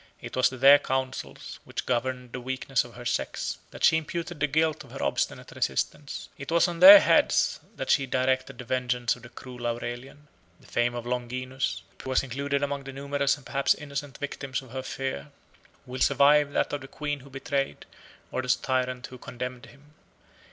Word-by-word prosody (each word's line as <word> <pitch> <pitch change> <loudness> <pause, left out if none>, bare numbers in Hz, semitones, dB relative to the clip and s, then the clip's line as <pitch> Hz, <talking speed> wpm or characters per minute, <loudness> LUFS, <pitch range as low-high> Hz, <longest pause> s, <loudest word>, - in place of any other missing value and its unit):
It - - -8
was 130 - +4
to 130 - -8
their 140 +3 +8
counsels, 130 - -4
which - - -5
governed 125 0 -2
the 125 - -5
weakness 130 0 -1
of 120 - -13
her 120 0 -10
sex, 120 - -2
that - - -10
she 160 - +6
imputed 170 +1 -4
the 150 - +2
guilt 155 +1 +1
of - - -16
her - - -6
obstinate - - -1
resistance; 145 -1 -2
it 135 - -7
was 170 +2 +4
on 170 -1 -5
their 300 +2 +12
heads - - +3 0.2
that - - -2
she 135 -3 +3
directed 130 +1 0
the 125 - -7
vengeance 125 0 0
of - - -16
the 120 - -12
cruel 125 0 -7
Aurelian. 120 +5 -5 0.3
The - - -21
fame 120 0 0
of 120 -1 -5
Longinus, 125 +2 -3 0.2
who - - -7
was 130 - +2
included 140 +2 -2
among 140 -1 -2
the 135 - -7
numerous 140 +1 0
and 140 - -17
perhaps 140 0 +2
innocent 145 -2 -6
victims 140 -2 -4
of 130 - -15
her 130 0 -4
fear, 130 - -4 0.6
will 130 +1 -6
survive 145 0 +5
that - - 0
of 145 - -2
the 135 - -9
queen 145 +1 -4
who 140 +1 -14
betrayed, 135 +1 -3 0.5
or 130 - -1
the 130 - -7
tyrant 130 -1 -1
who 125 - -11
condemned 125 0 -6
him. 145 +1 -19
130 Hz, 195 wpm, -27 LUFS, 125-140 Hz, 0.6 s, their